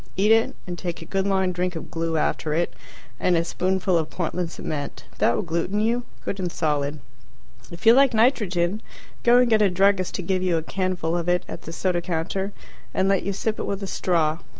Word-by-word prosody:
Eat 205 +3 +4
it, 225 0 +4
and 175 -2 -6
take 175 -2 -4
a - - -11
good 195 +3 -1
long 190 -2 +2
drink 180 0 -2
of 160 - -7
glue 165 -1 -1
after 150 0 0
it, 170 +1 0 0.5
and 180 -2 +3
a 165 - +1
spoonful 185 0 +1
of 160 - -3
Portland 175 0 -2
cement. 145 -3 -5 0.2
That 120 - +3
will - - -1
gluten 170 +4 -1
you, 235 +3 +1 0.2
good 195 - -3
and 180 -2 -2
solid. 150 -2 -1 0.7
If 170 +5 -10
you 225 - +9
like 275 +1 +5
nitrogen, 210 -5 +2 0.4
go 240 +1 +5
and 250 0 +5
get 220 -2 +4
a 205 - +5
druggist 190 0 +2
to 185 - -3
give 185 +1 0
you 180 -2 +1
a 160 - -2
canful 180 -2 -1
of 170 +1 -2
it 180 0 +1
at - - -7
the 165 - -8
soda 175 +1 0
counter, 185 +4 -2 0.4
and 190 - +2
let 195 -1 +3
you 200 - -2
sip 215 +3 -2
it - - -3
with 200 0 -3
a - - -3
straw. 165 -4 +1
180 Hz, 220 wpm, -24 LUFS, 165-195 Hz, 0.7 s, you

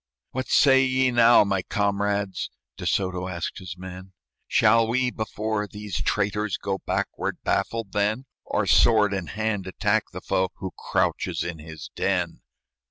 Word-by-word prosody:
"What 130 0 -3
say 135 -1 +5
ye 130 0 +2
now, 120 -1 +6
my 100 -2 0
comrades?" 100 -1 -1 0.3
De - - -5
Soto 90 -1 0
asked 85 +1 -4
his 90 -2 -8
men; 95 +1 -9 0.3
"Shall 115 +1 +4
we, 125 +2 +1
before 110 -1 -2
these 105 -3 -5
traitors, 105 -1 0
Go 95 -1 -3
backward, - - -2
baffled, 115 -4 -1
then; 105 +5 0 0.2
Or, - - -1
sword 105 -3 +5
in 95 -4 -3
hand, 105 -2 -2
attack 95 - +1
the - - -6
foe 95 0 0
Who 95 -2 -6
crouches - - -1
in 85 -2 -5
his 80 -1 -9
den?" 90 -3 -1
100 Hz, 150 wpm, -25 LUFS, 95-110 Hz, 0.3 s, now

